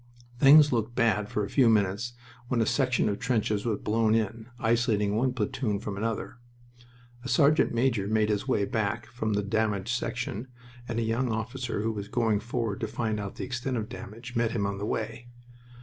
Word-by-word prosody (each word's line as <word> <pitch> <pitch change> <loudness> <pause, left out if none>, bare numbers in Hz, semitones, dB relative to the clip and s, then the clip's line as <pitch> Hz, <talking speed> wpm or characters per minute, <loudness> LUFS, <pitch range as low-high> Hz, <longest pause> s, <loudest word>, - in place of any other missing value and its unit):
Things 145 +1 +8
looked 115 0 -1
bad 105 -3 +2
for 105 - -1
a - - -8
few 130 -4 +5
minutes 105 +2 +1 0.3
when 125 -1 0
a 115 - +3
section 125 0 +1
of 100 -1 -1
trenches 110 -3 0
was 110 -3 +1
blown 110 0 +2
in, 110 +1 -2
isolating 110 -3 +1
one 125 +4 +2
platoon 110 -2 -1
from 105 -2 -5
another. 115 +3 -3 0.8
A 130 - -5
sergeant 140 +5 +4
major 115 -4 +1
made 110 0 +2
his 105 -1 -1
way 100 - +2
back 110 +1 -1
from 110 -3 -3
the 105 0 0
damaged 105 +1 0
section, 125 -1 -3 0.4
and 115 - -3
a 115 - +1
young 115 +2 0
officer 115 0 -3
who 115 - 0
was 100 -2 -5
going 110 -2 +1
forward 115 -2 -3
to 110 - -2
find 110 -1 -2
out 100 -1 -5
the - - -4
extent 125 0 -3
of 110 -1 -3
damage 115 +4 -9
met 115 -1 +1
him 105 -4 0
on 100 0 -3
the 105 - -3
way. 115 +3 -3
110 Hz, 195 wpm, -28 LUFS, 105-120 Hz, 0.8 s, Things